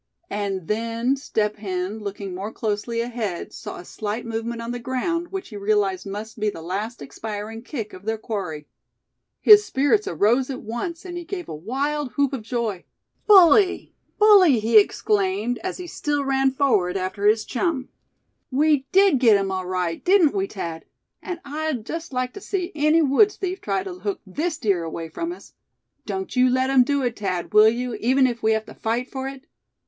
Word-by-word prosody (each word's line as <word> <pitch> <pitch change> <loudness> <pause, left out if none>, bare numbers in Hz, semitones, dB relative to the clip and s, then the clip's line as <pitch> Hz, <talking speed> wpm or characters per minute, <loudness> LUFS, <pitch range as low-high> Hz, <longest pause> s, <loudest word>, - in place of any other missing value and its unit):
And 195 -4 -3
then, 230 +4 0
Step 215 -6 -1
Hen, 190 0 -3
looking 200 -2 -6
more 195 +4 -5
closely 225 +2 -2
ahead, 230 -7 -4
saw - - -7
a 175 - -10
slight 215 +5 -4
movement 230 +1 -4
on 230 +1 -4
the 245 - -4
ground, 295 +8 -2
which 385 +1 -6
he 210 - -8
realized 200 -2 0
must 210 +3 -7
be 210 0 +1
the 165 -5 -8
last 205 +7 -4
expiring 220 -2 -6
kick 230 -4 -6
of 185 +2 -12
their 220 0 -1
quarry. 190 -9 -5 0.8
His 420 -1 +8
spirits 290 +7 +1
arose 240 +6 +2
at 265 - -5
once, 330 - -5
and 350 -1 -6
he - - -7
gave 355 +1 -6
a - - -6
wild 270 - -2
whoop 280 -1 +1
of 265 - -3
joy. 220 -4 -3 0.4
"Bully! 380 -1 +6 0.2
bully!" 395 - +7
he 220 0 +6
exclaimed, 205 +3 0
as 375 +1 -4
he 360 - -7
still 290 -4 -2
ran 270 0 +2
forward 220 -10 +1
after 190 +2 -1
his 215 +1 +3
chum; 265 0 -1 0.6
"we 285 0 +2
did 385 -7 +5
get 225 -5 +6
him 195 -1 -2
all 185 -1 -3
right, 180 -2 -2
didn't 360 -5 +4
we, 390 -1 -1
Thad? 170 - -6 0.4
And 360 -3 -5
I'd 295 -5 -3
just 330 +3 -5
like 255 -1 -2
to 400 - -9
see 370 -2 -3
any 305 +2 +3
woods' 400 +10 +4
thief 375 0 -4
try 195 -2 -1
to 180 -2 -7
hook 200 +1 -3
this 310 - -2
deer 195 -7 0
away 165 0 -5
from 335 - -4
us. 355 - -11 0.5
Don't 190 +1 -4
you 255 0 +5
let 260 +1 +1
'em 260 -2 +6
do 280 +1 0
it, 240 -3 -2
Thad, 185 -2 -3
will 215 +1 +8
you, 245 +1 -3
even 260 +3 +3
if 240 -2 -1
we 220 0 +3
have 220 0 -1
to - - -11
fight 235 +3 -2
for 265 -1 -5
it?" 270 -1 -9
235 Hz, 190 wpm, -23 LUFS, 205-285 Hz, 0.8 s, His